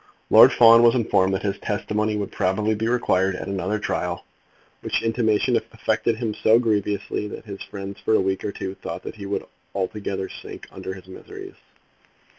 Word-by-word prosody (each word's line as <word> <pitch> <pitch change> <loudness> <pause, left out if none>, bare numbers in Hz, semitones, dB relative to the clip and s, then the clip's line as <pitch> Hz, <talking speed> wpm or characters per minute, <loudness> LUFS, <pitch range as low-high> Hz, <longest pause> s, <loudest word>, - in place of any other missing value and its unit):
Lord - - +9
Fawn 115 0 +7
was 120 0 +5
informed 95 -5 +2
that - - -4
his 100 -1 -2
testimony 105 +1 -1
would 100 -1 -4
probably 105 +3 0
be 110 +1 -2
required 95 -6 +1
at - - -6
another 100 +1 -1
trial, 90 -4 -3 0.6
which - - -1
intimation 115 -2 +1
affected 115 - -1
him 110 -1 -3
so 110 +2 +4
grievously 105 -2 -1
that 105 - -9
his 100 -2 -8
friends 100 0 -7
for 110 - +1
a - - +4
week 95 0 -1
or 105 - -2
two 95 -1 -5
thought - - -7
that - - -8
he 100 - -7
would 100 - -3 0.3
altogether 95 0 -3
sink - - -10
under 95 - -6
his 95 - -13
miseries. 385 - -10
105 Hz, 180 wpm, -23 LUFS, 95-110 Hz, 0.6 s, Lord